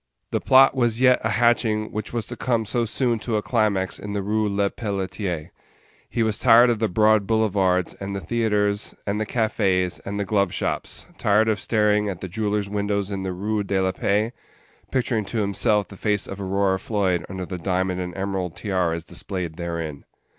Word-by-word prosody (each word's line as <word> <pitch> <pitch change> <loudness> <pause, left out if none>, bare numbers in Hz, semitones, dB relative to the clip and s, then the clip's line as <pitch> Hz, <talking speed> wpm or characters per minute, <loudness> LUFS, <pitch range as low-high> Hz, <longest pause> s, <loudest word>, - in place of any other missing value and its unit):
The - - 0
plot 135 +1 +6
was 120 -3 +1
yet 125 -1 +5
a - - +1
hatching 110 -1 +2
which 105 0 -4
was 120 -2 -2
to 120 - -6
come 115 -2 0
so 120 +2 0
soon 120 +1 0
to 115 +1 -2
a 105 - -2
climax 105 -5 0
in 100 +1 -6
the 100 -1 -2
Rue 105 +1 0
Lepelletier. 100 -4 -2 0.6
He 115 - 0
was 110 -1 0
tired 120 0 +6
of 115 - -1
the 110 -1 +1
broad 105 +1 +3
boulevards, 95 -5 +1
and 100 0 -4
the - - -2
theatres, 105 +1 0
and 105 +1 -1
the 110 - -2
cafés, 100 -6 0
and 100 +1 -4
the 100 - -1
glove 100 -2 +1
shops - - -3
tired 105 +2 +3
of 110 -1 +1
staring 105 -2 +2
at 95 -3 -5
the 95 - -5
jewellers' 105 +2 -1
windows 100 0 -1
in 100 -1 -3
the 95 -1 -3
Rue 105 +4 -1
de 100 -1 0
la 95 0 +1
Paix, 105 +5 0 0.6
picturing 120 -4 0
to 115 - -4
himself 105 -1 +1
the 100 - -12
face 105 -1 0
of 100 +1 -7
Aurora 95 0 +1
Floyd 95 -5 0
under 95 -1 -5
the 90 0 -6
diamond 90 0 -1
and 90 +1 -6
emerald 95 -3 -3
tiaras 85 -4 -1
displayed 90 -5 -5
therein. 85 -4 -4
100 Hz, 190 wpm, -23 LUFS, 95-110 Hz, 0.6 s, plot